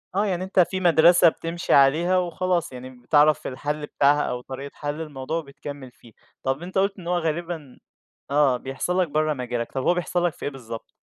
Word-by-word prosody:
آه، 205 - +2
يعني 185 -3 -1
أنت 190 0 0
في 185 +2 +3
مدرسة 170 0 +6
بتمشي 165 +2 -3
عليها 160 +7 +4
وخلاص 180 -2 -1
يعني 130 0 -8
بتعرف 145 +4 +2
الحَلّ 150 +3 -3
بتاعها 145 0 +3
أو 125 - -3
طريقة 135 +2 -8
حَلّ 150 +2 -4
الموضوع، 150 +1 -4
وبتكمِّل 140 -3 -8
فيه، 120 -2 -19 0.3
طَب 135 +3 -1
أنت 185 +2 -5
قُلت 195 +1 +1
إن 170 - -9
هو 175 0 +1
غالبًا 165 -3 -4 0.5
آه 140 -3 +3
بيحصل 135 +8 -2
لك 180 - +1
برّه 155 +1 0
مجالك، 125 -3 -4
طَب 130 - -3
هو 175 - +3
بيحصل 175 0 -1
لك 175 - 0
في - - -9
إيه 145 - -2
بالضبط؟ 115 -4 -9
150 Hz, 195 wpm, -24 LUFS, 135-175 Hz, 0.5 s, مدرسة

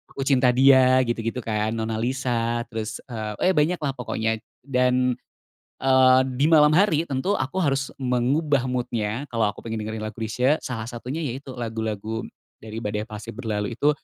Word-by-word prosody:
"Aku 135 - -4
Cinta 130 -2 +3
Dia" 130 -1 +6
gitu-gitu 120 +1 -2
kan, 110 -1 -1
"Nona 110 0 -2
Lisa," 120 -2 -1
terus, 110 -1 -4
eee, 110 - -1
eh - - 0
banyaklah 150 -1 +1
pokoknya. 110 -2 -1 0.2
Dan, 125 -1 +1 0.7
eee, 130 -1 +6 0.2
di 140 - +2
malam 150 -2 +6
hari 170 -5 +3
tentu 140 +9 0
aku 165 +6 -1
harus 135 -1 0
mengubah 130 +2 +1
mood-nya 120 0 -2
kalo 115 -3 +2
aku 105 - -13
pengen 110 -1 -4
dengerin 110 0 -5
lagu 110 +1 -7
Chrisye, 125 +7 +1
salah 115 -3 -4
satunya 125 +7 -5
yaitu 130 +1 -6
lagu-lagu 110 -1 -3 0.4
dari 110 0 -9
"Badai 105 0 -3
Pasti 105 0 -7
Berlalu" 105 -2 -3
itu, 125 +5 +1
125 Hz, 160 wpm, -24 LUFS, 110-135 Hz, 0.7 s, Dia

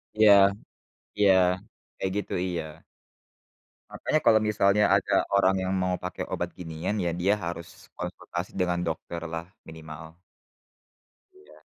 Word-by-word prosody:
Iya. 110 -1 +6 0.9
Iya, 100 -2 +6 0.6
kayak 95 -1 -2
gitu, 105 - -3
iya. 85 -3 -3 1.3
Makanya 155 - 0
kalau 110 -1 +6
misalnya 105 -1 +3
ada - - +2
orang 95 -1 +4
yang 95 +1 -1
mau 90 0 0
pakai 90 0 -5
obat 85 0 -2
ginian, 85 +4 -4
ya, 85 -2 0
dia 95 +3 +2
harus 85 -1 -7
konsultasi 85 +2 -5
dengan 90 -1 +1
dokter 85 0 -4
lah 80 +1 -5 0.2
minimal. 80 +1 -10 1.1
Iya. 385 +2 -19
90 Hz, 120 wpm, -27 LUFS, 85-100 Hz, 1.3 s, Iya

